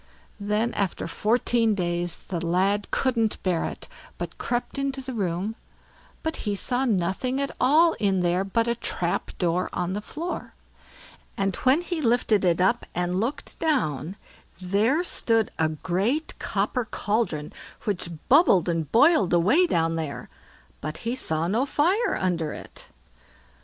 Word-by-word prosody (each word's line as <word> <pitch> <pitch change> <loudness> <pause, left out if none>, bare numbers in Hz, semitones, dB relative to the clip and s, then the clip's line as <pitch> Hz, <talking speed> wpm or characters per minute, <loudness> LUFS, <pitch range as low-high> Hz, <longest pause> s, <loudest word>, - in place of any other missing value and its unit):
Then 210 +3 0
after 195 -3 -2
fourteen 225 +3 +1
days 175 -2 -2
the 175 -2 -4
lad 190 +4 +1
couldn't 235 -5 +1
bear 180 -3 +1
it, - - -6 0.3
but - - -6
crept 245 +3 -2
into 275 -1 -2
the 260 0 -6
room, 195 0 -2 0.7
but 320 0 -2
he 205 -2 -2
saw 250 +6 +1
nothing 210 +5 0
at 280 0 -1
all 315 +6 +5
in 195 -3 +2
there 180 +2 +1
but 230 +4 0
a 235 - +2
trap 175 -6 -2
door 175 +1 0
on 180 +1 -1
the 205 - -3
floor; 330 +10 -6 0.8
and 195 -2 0
when 270 +6 +3
he 350 -2 -3
lifted 230 -5 +2
it 175 -2 +2
up 190 +7 +2
and 180 +1 0
looked 235 +7 -4
down, 175 - 0 0.4
there 210 - +2
stood 225 - +1
a 160 -1 +3
great 190 - -1
copper 250 -3 -1
cauldron 205 -9 -2 0.3
which 195 -5 -2 0.2
bubbled 265 - +5
and 165 -3 -1
boiled 240 - +5
away 215 - +4
down 165 - +1
there; 155 -3 -5 0.5
but 155 +2 -4
he 235 - 0
saw 160 -10 -1
no 220 +8 +1
fire 350 - +1
under 165 -4 -1
it. - - -11
205 Hz, 145 wpm, -25 LUFS, 175-255 Hz, 0.8 s, all